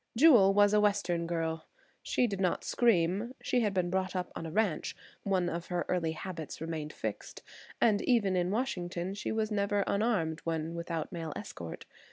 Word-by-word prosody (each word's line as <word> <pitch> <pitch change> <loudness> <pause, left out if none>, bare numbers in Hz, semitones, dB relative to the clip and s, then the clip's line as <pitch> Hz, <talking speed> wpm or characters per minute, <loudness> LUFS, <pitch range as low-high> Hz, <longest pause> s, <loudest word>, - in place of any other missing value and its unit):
Jewel 240 -9 +7
was 205 0 +5
a 210 - +5
Western 185 -5 +1
girl. 165 -1 -2 0.3
She 250 - +1
did 200 -4 -2
not 180 -2 +1
scream. 210 +2 +2
She 250 - +2
had 215 -4 +1
been 180 -2 0
brought 190 0 -1
up 180 -1 -2
on 165 - -5
a - - -6
ranch; 200 -4 0 0.3
one 190 -3 +1
of 170 +1 -4
her 175 -1 -1
early 165 -3 0
habits 160 -1 -6
remained 160 -2 -4
fixed, - - -6 0.4
and 215 -3 +4
even 210 -7 +2
in 180 0 +1
Washington 185 -6 -2
she 205 - -4
was 220 0 -1
never 200 -1 +1
unarmed 200 -7 0
when 165 0 -2
without 170 -2 -4
male 165 -4 -5
escort. 85 -5 -7
185 Hz, 180 wpm, -31 LUFS, 165-205 Hz, 0.4 s, Jewel